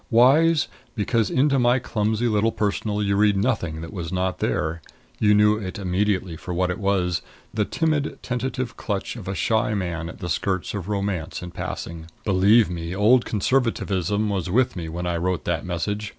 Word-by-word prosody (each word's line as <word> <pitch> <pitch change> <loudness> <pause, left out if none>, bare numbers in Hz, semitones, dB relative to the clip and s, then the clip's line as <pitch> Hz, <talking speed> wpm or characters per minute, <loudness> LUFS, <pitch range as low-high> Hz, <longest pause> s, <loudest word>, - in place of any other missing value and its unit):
Wise, 145 +7 +5 0.3
because 110 -1 +1
into 135 +1 +3
my 120 +1 +4
clumsy 110 -1 0
little 110 0 +2
Personal 105 0 -1
you 100 0 +1
read 105 0 +3
nothing 95 -8 -1
that 80 - -8
was 85 -3 -5
not 95 0 -1
there. 80 +2 -1 0.4
You 105 -1 +4
knew 105 +1 +5
it 100 0 -5
immediately 95 -2 0
for 90 +2 -6
what 90 0 +1
it - - -4
was 95 -4 +1 0.3
the 110 -2 +1
timid 155 0 0
tentative 130 0 -3
clutch 100 +1 -3
of 110 -6 -9
a 95 - -2
shy 110 0 +1
man 85 -4 -3
at - - -10
the 90 - -5
skirts 95 +2 -1
of 100 -2 -5
Romance 100 -5 -2
in 90 - -7
passing. 80 -1 -6 0.2
Believe 100 +3 +5
me, 85 0 -4
old 115 +5 +4
Conservatism 105 -4 0
was 95 -3 -2
with 125 +6 +2
me 85 -3 -5
when 85 +2 -4
I 85 -1 0
wrote 90 0 -1
that 85 0 -2
message. 105 +4 -2
100 Hz, 180 wpm, -24 LUFS, 90-110 Hz, 0.4 s, Wise